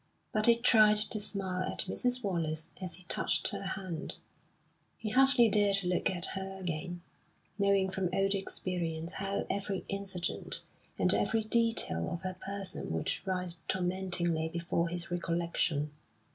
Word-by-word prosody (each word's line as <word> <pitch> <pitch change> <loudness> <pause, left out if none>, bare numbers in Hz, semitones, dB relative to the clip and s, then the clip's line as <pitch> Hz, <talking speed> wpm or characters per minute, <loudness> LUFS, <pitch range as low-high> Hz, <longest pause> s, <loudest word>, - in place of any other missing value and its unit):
But 215 +1 +3
he 235 - +7
tried 215 -3 +6
to 215 +1 +2
smile 195 -3 -3
at - - -1
Mrs. 245 +6 -1
Wallace 160 -4 -2
as 185 -2 -1
he 185 - -12
touched - - +1
her - - -4
hand; 190 -3 -4 0.8
he 220 - -4
hardly 265 -1 +6
dared 200 -2 +3
look 180 0 +1
at 180 -1 +1
her 190 0 -5
again, 175 0 -4 0.6
knowing 200 -1 +3
from 190 -2 -1
old 195 +1 +2
experience 175 -4 -3
how 195 +1 -2
every 200 -1 -3
incident 195 -3 -1 0.3
and - - +4
every 225 -1 +1
detail 225 - +3
of 170 - -4
her 185 0 -4
person 195 -1 -4
would 80 -1 -1 0.2
rise 180 -2 -1
tormentingly 175 -3 0
before 170 0 -1
his 175 +1 -5
recollection. 170 -3 -1
190 Hz, 145 wpm, -32 LUFS, 175-200 Hz, 0.8 s, he